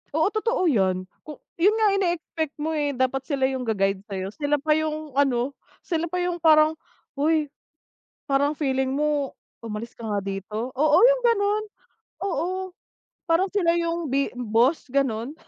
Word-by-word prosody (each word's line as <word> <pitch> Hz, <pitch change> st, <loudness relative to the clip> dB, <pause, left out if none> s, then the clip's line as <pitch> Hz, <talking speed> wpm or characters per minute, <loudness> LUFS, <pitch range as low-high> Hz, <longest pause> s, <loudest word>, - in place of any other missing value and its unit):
Oo, 320 Hz, +2 st, +3 dB
totoo 450 Hz, -2 st, 0 dB
'yan, 190 Hz, -, +2 dB, 0.2 s
ku 300 Hz, -3 st, -10 dB, 0.2 s
'yon 405 Hz, +6 st, +4 dB
nga 440 Hz, -1 st, +4 dB
ineexpect 340 Hz, -5 st, -1 dB
mo, 310 Hz, +2 st, -2 dB
eh, 290 Hz, -2 st, -1 dB
dapat 260 Hz, +1 st, +1 dB
sila 275 Hz, -3 st, +1 dB
yung 265 Hz, -1 st, -1 dB
ga 220 Hz, -, +1 dB
guide 195 Hz, 0 st, +1 dB
sa'yo, 190 Hz, 0 st, -4 dB
sila 295 Hz, +2 st, 0 dB
pa 305 Hz, +2 st, +1 dB
yung 310 Hz, -1 st, -2 dB
ano, 270 Hz, -1 st, +1 dB, 0.3 s
sila 335 Hz, -1 st, -1 dB
pa 360 Hz, -, -3 dB
yung 355 Hz, -1 st, -2 dB
parang, 310 Hz, -1 st, +6 dB, 0.4 s
"Hoy 305 Hz, +2 st, +2 dB, 0.8 s
parang 285 Hz, +2 st, +1 dB
feeling 265 Hz, -3 st, 0 dB
mo 295 Hz, -1 st, 0 dB, 0.3 s
umalis 225 Hz, +1 st, -6 dB
ka 230 Hz, -, -10 dB
nga 205 Hz, -1 st, 0 dB
dito," 210 Hz, +5 st, -4 dB
oo 300 Hz, +3 st, +4 dB
yung -, -, +4 dB
gano'n, 425 Hz, -3 st, +2 dB, 0.6 s
oo 370 Hz, +1 st, -2 dB, 0.6 s
parang 340 Hz, +3 st, +2 dB
sila 360 Hz, -4 st, +2 dB
yung 335 Hz, -1 st, -1 dB
b 275 Hz, +1 st, +1 dB
boss 245 Hz, +5 st, +2 dB
gano'n. 260 Hz, -1 st, 0 dB
295 Hz, 160 wpm, -24 LUFS, 255-335 Hz, 0.8 s, parang